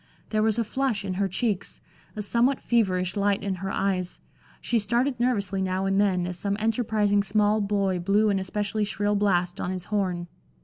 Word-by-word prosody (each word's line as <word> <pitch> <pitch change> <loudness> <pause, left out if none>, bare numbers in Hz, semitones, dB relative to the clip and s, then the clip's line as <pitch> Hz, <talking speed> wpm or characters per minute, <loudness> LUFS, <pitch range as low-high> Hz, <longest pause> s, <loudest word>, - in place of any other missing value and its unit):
There 215 -1 +2
was 220 0 +2
a 230 - +2
flush 230 -2 -1
in 190 - -2
her 200 - +2
cheeks, 200 0 -2 0.4
a 210 - -3
somewhat 240 +6 +2
feverish 185 -6 +1
light 200 -1 +1
in 200 -1 -1
her 195 - -3
eyes; 190 -2 -1 0.4
she 235 - 0
started 240 +4 0
nervously 200 -6 0
now 190 0 -1
and 195 +1 +2
then 185 -3 +1
as 180 0 -5
some 200 0 -1
enterprising 215 -2 +1
small 210 +2 +2
boy 200 -2 0
blew 205 +4 +2
an 195 - +1
especially 205 +2 -2
shrill 205 0 0
blast 180 -4 +1
on - - -2
his 185 -1 -3
horn. 180 -4 0
200 Hz, 185 wpm, -26 LUFS, 190-215 Hz, 0.4 s, There